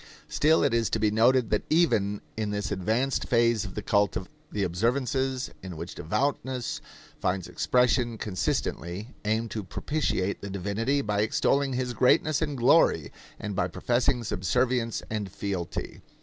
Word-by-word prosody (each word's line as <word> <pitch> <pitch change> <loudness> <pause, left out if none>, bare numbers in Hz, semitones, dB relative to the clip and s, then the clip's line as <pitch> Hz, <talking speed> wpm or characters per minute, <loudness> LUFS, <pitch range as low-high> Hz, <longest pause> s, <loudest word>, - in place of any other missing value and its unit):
Still 155 +2 +3
it 140 -4 +2
is 115 -1 +2
to 110 - 0
be 105 -1 +2
noted 120 +2 +3
that 105 - +2
even 105 - +2
in 110 -1 -2
this 105 0 -2
advanced 110 +8 0
phase 115 -2 +3
of 95 - -8
the 105 - -4
cult 100 -6 +2 0.3
the 105 - -1
observances 125 +7 0
in 90 -3 -7
which 85 +2 -6
devoutness 125 - -2 0.4
finds 90 -1 -1
expression 125 -2 +2
consistently 95 0 -2 0.2
aim 110 +2 +1
to 110 -2 -4
propitiate 100 -4 -1
the 100 - -6
divinity 105 +9 -1
by 105 -1 0
extolling 135 +5 +1
his 125 -1 -1
greatness 145 +5 +3
and 150 -3 -1
glory 120 - +4 0.3
and 105 -2 -4
by 90 -2 +1
professing 120 +6 0
subservience 115 +5 0
and 105 -3 -3
fealty. 95 -4 -4
110 Hz, 150 wpm, -27 LUFS, 100-130 Hz, 0.4 s, glory